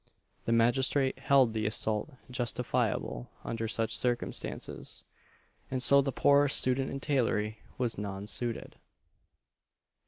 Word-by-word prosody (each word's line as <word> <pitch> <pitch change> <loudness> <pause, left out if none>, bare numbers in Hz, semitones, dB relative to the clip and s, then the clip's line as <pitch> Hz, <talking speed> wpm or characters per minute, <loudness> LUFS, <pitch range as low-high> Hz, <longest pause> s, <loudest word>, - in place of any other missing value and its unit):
The - - 0
magistrate 130 +4 +3
held 135 -4 +4
the 110 -1 -1
assault 110 +5 0 0.2
justifiable 120 - -1
under 115 0 -3
such 110 0 +1
circumstances, 120 0 -2 0.7
and 130 -1 -1
so 140 0 +6
the 135 0 -1
poor 145 +2 +4
"student 130 -1 +2
in 135 - -4
tailory" 115 -7 0 0.2
was 120 -5 -1
non 100 -1 -5
suited. 115 +2 -3
120 Hz, 115 wpm, -30 LUFS, 110-135 Hz, 0.7 s, so